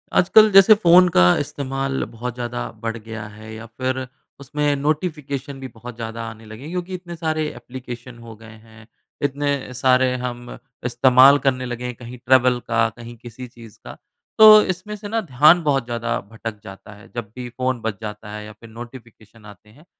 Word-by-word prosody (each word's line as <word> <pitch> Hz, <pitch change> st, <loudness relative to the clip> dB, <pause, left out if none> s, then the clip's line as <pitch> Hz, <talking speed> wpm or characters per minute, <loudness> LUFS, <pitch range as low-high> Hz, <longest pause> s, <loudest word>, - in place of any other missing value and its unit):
आजकल 215 Hz, +4 st, +6 dB
जैसे 195 Hz, +3 st, +8 dB
फ़ोन 180 Hz, -3 st, +6 dB
का 90 Hz, -, +6 dB
इस्तेमाल 135 Hz, -1 st, -3 dB
बहुत 120 Hz, +1 st, -6 dB
ज़्यादा 120 Hz, 0 st, -5 dB
बढ़ 115 Hz, 0 st, -3 dB
गया 110 Hz, -1 st, -8 dB
है 110 Hz, +1 st, -12 dB
या 110 Hz, +1 st, -9 dB
फिर 130 Hz, +3 st, -4 dB, 0.3 s
उसमें 145 Hz, +1 st, -1 dB
नोटिफ़िकेशन 145 Hz, -2 st, -3 dB
भी 135 Hz, -, -7 dB
बहुत 120 Hz, 0 st, -11 dB
ज़्यादा 115 Hz, 0 st, -6 dB
आने 110 Hz, 0 st, -13 dB
लगे 110 Hz, +4 st, -11 dB
हैं, 150 Hz, -, -8 dB
क्योंकि 180 Hz, +1 st, -5 dB
इतने 175 Hz, -1 st, -7 dB
सारे 155 Hz, -2 st, -2 dB
एप्लीकेशन 125 Hz, 0 st, -10 dB
हो 115 Hz, -1 st, -11 dB
गए 110 Hz, +1 st, -15 dB, 0.2 s
हैं। 110 Hz, 0 st, -17 dB, 0.4 s
इतने 140 Hz, -2 st, -2 dB
सारे 130 Hz, 0 st, +2 dB
हम 120 Hz, -1 st, -6 dB, 0.3 s
इस्तेमाल 130 Hz, +3 st, +6 dB
करने 130 Hz, -1 st, 0 dB
लगे 120 Hz, 0 st, -5 dB
हैं 125 Hz, -1 st, -5 dB
कहीं 120 Hz, +1 st, -10 dB
ट्रैवल 125 Hz, 0 st, +3 dB
का 115 Hz, -1 st, +2 dB
कहीं 120 Hz, 0 st, -10 dB
किसी 120 Hz, +2 st, -10 dB
चीज़ 115 Hz, -4 st, -15 dB
का। -, -, -10 dB, 0.4 s
तो 215 Hz, -1 st, +9 dB
इसमें 210 Hz, +4 st, -9 dB
से 205 Hz, 0 st, -9 dB
ना 225 Hz, +2 st, -1 dB
ध्यान 155 Hz, -, +4 dB
बहुत 135 Hz, -5 st, +1 dB
ज़्यादा 120 Hz, -1 st, -3 dB
भटक 115 Hz, -1 st, -7 dB
जाता 95 Hz, +2 st, -12 dB
है, 105 Hz, 0 st, -17 dB
जब 115 Hz, -4 st, -6 dB
भी 125 Hz, -1 st, -7 dB
फ़ोन 130 Hz, 0 st, -3 dB
बच 110 Hz, -3 st, -4 dB
जाता 105 Hz, -1 st, -8 dB
है 105 Hz, 0 st, -8 dB
या 105 Hz, -, -10 dB
फिर 115 Hz, +2 st, -16 dB
नोटिफ़िकेशन 115 Hz, -2 st, -13 dB
आते 105 Hz, 0 st, -15 dB
हैं। 145 Hz, +9 st, -20 dB
125 Hz, 185 wpm, -21 LUFS, 115-140 Hz, 0.4 s, तो